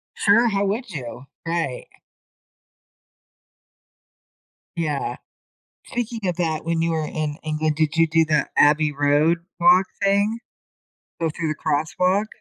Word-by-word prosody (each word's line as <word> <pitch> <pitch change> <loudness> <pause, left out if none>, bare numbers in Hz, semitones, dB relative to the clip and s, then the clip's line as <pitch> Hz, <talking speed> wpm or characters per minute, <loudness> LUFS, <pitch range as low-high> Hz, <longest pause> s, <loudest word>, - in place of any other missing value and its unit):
Sure, 230 +4 +4
how 200 -1 0
would 220 +4 -2
you? 125 -5 -7 0.2
Right. 165 -6 -2 2.9
Yeah. 155 -4 -2 0.7
Speaking 235 -3 -4
of 175 - -3
that, 160 -3 -1
when 165 0 -1
you 165 - +1
were 160 -1 -1
in 150 -1 -3
England, 155 0 -1
did 155 +1 0
you 165 0 +5
do 165 +1 +3
the 155 -1 +1
Abbey 150 0 +4
Road 145 +4 +2 0.2
walk 180 +2 +5 0.2
thing? 200 +3 +2 0.8
Go 165 -1 0
through 165 +1 -3
the 155 - -1
crosswalk? 180 +7 0
165 Hz, 125 wpm, -22 LUFS, 155-195 Hz, 2.9 s, you